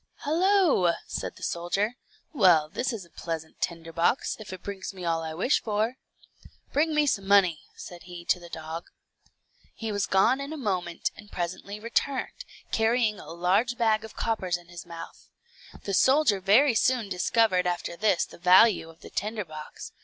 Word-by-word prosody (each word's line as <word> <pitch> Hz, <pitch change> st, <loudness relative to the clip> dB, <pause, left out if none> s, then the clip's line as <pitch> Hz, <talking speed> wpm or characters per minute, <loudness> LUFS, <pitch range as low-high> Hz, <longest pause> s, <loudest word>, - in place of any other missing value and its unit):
"Hallo," 330 Hz, -, +3 dB
said -, -, -5 dB
the -, -, -13 dB
soldier; 195 Hz, +6 st, -1 dB, 0.4 s
"well 175 Hz, -, +5 dB
this 245 Hz, +9 st, -2 dB
is 215 Hz, -6 st, -6 dB
a 170 Hz, -, -23 dB
pleasant 160 Hz, -2 st, -6 dB
tinderbox, 165 Hz, +6 st, 0 dB
if 215 Hz, -, -9 dB
it 185 Hz, -, -8 dB
brings 195 Hz, -1 st, -6 dB
me 180 Hz, -2 st, -7 dB
all 165 Hz, -1 st, 0 dB
I 160 Hz, -1 st, -5 dB
wish 220 Hz, -, +2 dB
for." 220 Hz, +3 st, -1 dB, 0.8 s
"Bring 310 Hz, +2 st, +2 dB
me 300 Hz, 0 st, +4 dB
some 195 Hz, -8 st, 0 dB
money," 185 Hz, -6 st, +4 dB
said 175 Hz, -1 st, -10 dB
he 175 Hz, -1 st, -9 dB
to 180 Hz, -, +2 dB
the 175 Hz, -1 st, -12 dB
dog. 160 Hz, +1 st, -6 dB, 0.9 s
He 225 Hz, -1 st, -4 dB
was 205 Hz, -1 st, -1 dB
gone 195 Hz, +8 st, +3 dB
in 280 Hz, +2 st, -6 dB
a -, -, -6 dB
moment, 185 Hz, -, -2 dB
and 205 Hz, 0 st, -14 dB
presently 185 Hz, +4 st, -4 dB
returned, 260 Hz, -, -2 dB, 0.3 s
carrying 225 Hz, -1 st, +2 dB
a -, -, -11 dB
large 185 Hz, +8 st, +1 dB
bag 220 Hz, -2 st, +2 dB
of 220 Hz, -, -10 dB
coppers 190 Hz, -6 st, -1 dB
in 175 Hz, 0 st, -18 dB
his 175 Hz, -1 st, -10 dB
month. 170 Hz, -1 st, -10 dB, 0.6 s
The 200 Hz, -, -3 dB
soldier 260 Hz, -1 st, +4 dB
very 230 Hz, +8 st, +5 dB
soon 240 Hz, 0 st, +2 dB
discovered 185 Hz, 0 st, +2 dB
after 175 Hz, -1 st, -2 dB
this 200 Hz, -2 st, +2 dB
the -, -, -15 dB
value 180 Hz, 0 st, +5 dB
of 165 Hz, -, -17 dB
the -, -, -12 dB
tinder 210 Hz, 0 st, -3 dB
box. 155 Hz, -1 st, -9 dB
195 Hz, 175 wpm, -27 LUFS, 175-230 Hz, 0.9 s, well